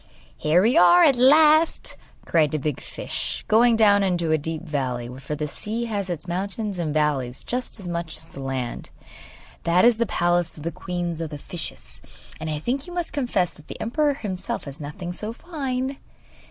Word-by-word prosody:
'Here 160 +4 +3
we 230 +4 +3
are 175 0 +7
at 275 - +6
last,' 305 +5 +5 0.3
cried 155 -3 +2
a - - +2
big 150 -1 -2
fish, - - -4
going 230 +2 +5
down 205 -2 +5
into 175 -4 +1
a 155 - +4
deep 160 +1 -3
valley, 130 -5 -2
for 140 +2 -4
the 150 0 -3
sea 220 +10 -4
has 205 -4 -3
its 175 0 -4
mountains 195 +2 -2
and 160 -3 -1
valleys 140 -5 0
just 250 -2 -3
as 190 - -7
much 170 -2 -3
as - - -7
the 150 - -12
land. 135 -3 -4 0.7
'That 175 +4 +4
is 240 -2 +5
the 235 - +2
palace 175 -2 +1
of 150 - -9
the 170 - -2
queen 175 -1 -3
of 160 - -3
the 150 - -6
fishes, 170 +3 -6 0.4
and 160 - -4
I 155 - -1
think 260 - -2
you 355 - -8
must 350 -1 -2
confess 240 - 0
that 155 - -16
the - - -8
emperor 290 +5 +1
himself 190 -8 -4
has 140 +2 -7
nothing 175 +5 -6
so 215 +5 -4
fine. 270 -3 -3
175 Hz, 195 wpm, -24 LUFS, 155-235 Hz, 0.7 s, are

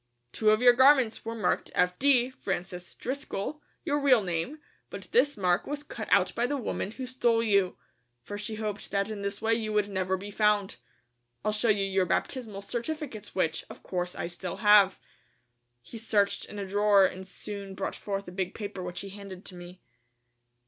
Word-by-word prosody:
Two 215 - +2
of 215 +3 +3
your 245 -1 +8
garments 260 -2 +5
Were 230 0 -4
marked 210 -5 0
F.D., 245 +8 +3
Francis 180 -6 -5
Driscoll, 280 +1 -4 0.2
your 290 -3 +1
real 260 -6 +5
name, 175 - -2 0.3
but - - -7
this 290 - +3
mark 180 -1 +1
was 290 0 -4
cut - - -7
out - - +4
by 240 +1 0
the 285 - -1
woman 235 -5 -3
who 260 - -5
stole 240 -3 +1
you, 200 -4 +2 0.5
for 205 - -6
she 210 +1 -4
hoped 215 -1 -4
that 200 +1 0
in 210 -2 -5
this 200 +2 -4
way 225 0 +3
you 220 -1 -1
would 210 -1 +2
never 190 -1 -1
be 200 +2 -8
found. 210 -1 +2 0.7
I'll 215 - +2
show 215 +2 +1
you 200 -2 +3
your 190 -1 +1
baptismal 220 -7 -2
certificates 240 -1 -5
which, 160 -3 0
of - - -12
course, 180 -1 -3
I - - -3
still 175 +1 -5
have." 205 -2 +7 0.9
He 225 - -9
searched 210 -3 +1
in 210 - -10
a 200 - -3
drawer 200 0 +4
and 190 0 -4
soon 200 0 -7
brought 190 - -3
forth 200 -1 -4
a - - -7
big 185 0 -3
paper 205 -3 -5
which 180 0 -5
he 200 - -7
handed 195 -1 -10
to 185 - -10
me. 175 +1 -11
205 Hz, 190 wpm, -28 LUFS, 190-230 Hz, 0.9 s, your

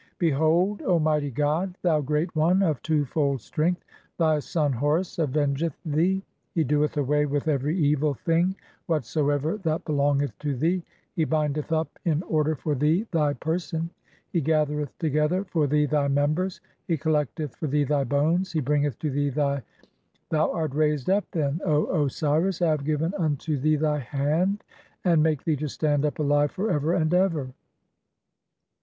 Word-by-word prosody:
Behold, 165 +5 +2
O 175 -3 +2
mightv 150 -2 +1
god, 160 +6 0
"thou 160 -4 +3
great 150 +5 -1
one 175 +5 +3
of 155 -6 +1
(4) - - -33
two 155 -2 +1
fold 140 0 0
strength, 175 +8 -1 0.3
thy 155 -3 +3
son 150 -1 0
Horus 150 +8 0
aveng 145 -2 0
"eth 165 -4 -2
thee. 175 +6 +1 0.3
He 165 - +3
doeth 150 +2 +1
away 150 +1 +2
with 145 +2 -2
every 150 +3 0
evil 150 -2 +2
thing 170 +6 +1 0.3
whatsoever 150 - 0
"that 165 -5 -2
belongeth 145 -1 +1
to 145 -2 -2
thee, 170 +8 +1 0.3
he 160 - +1
bindeth 150 -1 -1
up 160 0 -1
in 160 0 +1
order 155 -2 +1
for 150 +2 -2
thee 155 - +2
thv 150 -3 +1
"person, 165 0 -2 0.4
he 170 - +2
gathereth 150 -2 0
together 155 +4 +1
for 160 -5 0
thee 150 +1 +2
thy 145 -1 +1
members, 150 +7 0 0.3
he 165 - +1
col 160 +2 0
"lecteth 150 -1 -2
for 155 - -3
thee 145 +1 +2
thy 145 0 +1
bones, 160 +7 +1
he 160 - +1
bringeth 145 -2 0
to 150 - -2
thee 145 +1 0
thy 140 0 0
"(5)..; 135 - -8 0.7
thou 155 -1 +2
art 160 -5 -2
raised 150 +1 +1
up, 200 +1 +2
then, 150 0 -1
O 155 -1 +1
Osiris, 155 +6 0
I 170 - +4
have 150 -2 -1
given 155 +4 0
unto 155 -1 0
"thee 155 +3 +2
thy 150 0 +1
hand, 150 - 0 0.4
and 180 - +3
I - - +4
make 155 -3 +1
thee 155 -3 +1
to 150 +1 -3
stand 145 0 0
up 150 - -1
alive 145 -1 +2
for 205 +7 -2
ever 150 +3 +1
"and 160 -1 +1
ever. 165 -8 +1
150 Hz, 175 wpm, -25 LUFS, 145-165 Hz, 0.7 s, I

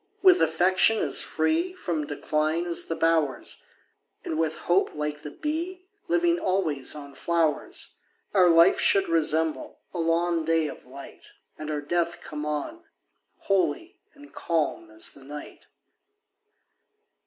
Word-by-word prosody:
With 370 -1 +7
affection 185 +6 +4
as - - +2
free 340 +3 0
From 160 - -3
decline 155 +3 -1
as 170 -1 +1
the 165 - -2
bowers, 160 -6 0 0.6
And, 160 - -2
with 160 -1 0
hope, 175 +3 +2
like 150 0 -3
the 150 - -7
bee, 335 - -4 0.2
Living 340 0 +2
always 165 - 0
on 140 -2 -9
flowers, 165 -1 -1 0.4
Our 185 -3 +5
life 165 +1 +6
should 195 -1 +3
resemble 160 -1 0 0.2
a 175 - -4
long 165 0 +1
day 165 0 +2
of 145 - -10
light, 135 +2 -12 0.2
And 155 0 -7
our 150 -1 -2
death 170 +3 -1
come 150 0 -6
on, 150 - -4 0.6
holy 335 - -1 0.2
and 290 +1 -16
calm 170 - -2
as 330 +1 +2
the 135 - -12
night. 145 +2 -10
165 Hz, 135 wpm, -26 LUFS, 150-220 Hz, 0.6 s, With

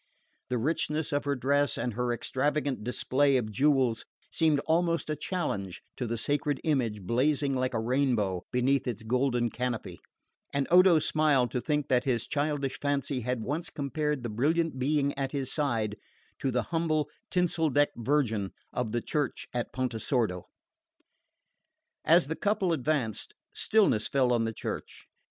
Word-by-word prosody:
The 125 - 0
richness 150 +3 -1
of 145 - 0
her 140 0 +1
dress 140 +3 +2
and 120 - -2
her 125 +2 -1
extravagant 140 +1 -1
display 135 +3 +2
of 110 -4 -2
jewels 130 -2 +2 0.3
seemed 160 -3 +3
almost 165 0 +1
a - - 0
challenge 120 - -3
to 125 - -3
the 115 +1 -2
sacred 145 +4 0
image 120 -10 0
blazing 135 +6 +1
like 130 -1 -1
a - - +1
rainbow 115 -6 +1
beneath 130 +2 +1
its 115 -3 -3
golden 120 0 +1
canopy; 125 -2 -3 0.5
and 140 -1 0
Odo 180 -1 +7
smiled 145 -6 +2
to 125 - -1
think 150 0 -1
that 125 0 +2
his 120 -4 0
childish 145 -2 -1
fancy 140 -1 -1
had 125 -1 -2
once 150 +8 -3
compared 150 -1 -2
the 120 - -3
brilliant 150 +6 0
being 140 +1 +1
at 135 0 -2
his 135 -2 -2
side 115 -8 0 0.4
to 135 - 0
the 125 -1 0
humble 155 -3 +1 0.2
tinsel 175 -3 +1
decked 145 +1 +2
Virgin 115 -6 0 0.2
of 115 -3 -2
the 120 - -1
church 150 -4 -2
at 120 -1 -2
Pontesordo. 115 -6 -1 1.6
As 170 +2 +5
the 160 +3 -3
couple 200 -3 +1
advanced, 135 -7 -1 0.2
stillness 200 - +2
fell 130 -3 +2
on 115 -1 +2
the 115 - -2
church. - - -6
135 Hz, 155 wpm, -29 LUFS, 120-150 Hz, 1.6 s, Odo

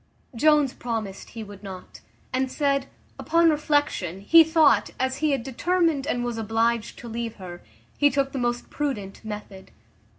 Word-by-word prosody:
Jones 295 +1 +4
promised 220 -5 -5
he 225 -2 -7
would 205 -2 -11
not; 190 -3 -10 0.3
and 260 0 0
said, 275 -2 0 0.3
upon 335 +1 +3
reflection, 290 - 0
he 330 +11 +7
thought, 320 -2 +4
as 260 0 0
he 310 +1 +1
had 275 -4 0
determined 320 +2 0
and 245 -5 -1
was 240 -2 -3
obliged 225 +1 0
to 240 - -9
leave 230 0 -4
her, 175 -3 -9 0.4
he 290 - +5
took 275 -1 0
the 270 - -4
most 240 0 -2
prudent 230 -11 -4
method. 210 -3 -8
245 Hz, 160 wpm, -25 LUFS, 220-290 Hz, 0.4 s, he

